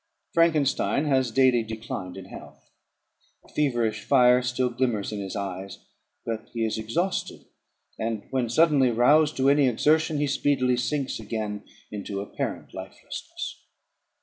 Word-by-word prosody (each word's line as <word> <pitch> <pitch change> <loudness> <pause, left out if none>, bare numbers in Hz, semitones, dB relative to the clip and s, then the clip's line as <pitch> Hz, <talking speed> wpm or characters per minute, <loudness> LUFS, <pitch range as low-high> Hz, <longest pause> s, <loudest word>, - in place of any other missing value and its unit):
Frankenstein 155 -3 +2
has 130 -4 +2
daily 125 0 +4
declined 110 -4 -6
in 95 - -8
health: - - -13 0.7
a - - -20
feverish 120 -7 0
fire 125 -2 +5
still 125 0 0
glimmers 120 -5 -1
in 105 - -4
his 95 -2 -5
eyes; 95 -1 -5 0.5
but 110 -1 -4
he 115 -1 0
is 110 0 -2
exhausted, 170 - -2 0.5
and, 110 -2 -2
when 130 -3 0
suddenly 145 -1 +4
roused 145 +6 +4
to 135 0 +2
any 140 -1 +5
exertion, 155 +6 +2
he 145 - +1
speedily 135 -2 +1
sinks 130 +3 -2
again 105 -2 -4 0.3
into 100 -1 -5
apparent 100 - -5
lifelessness. - - -7
125 Hz, 135 wpm, -26 LUFS, 110-140 Hz, 0.7 s, fire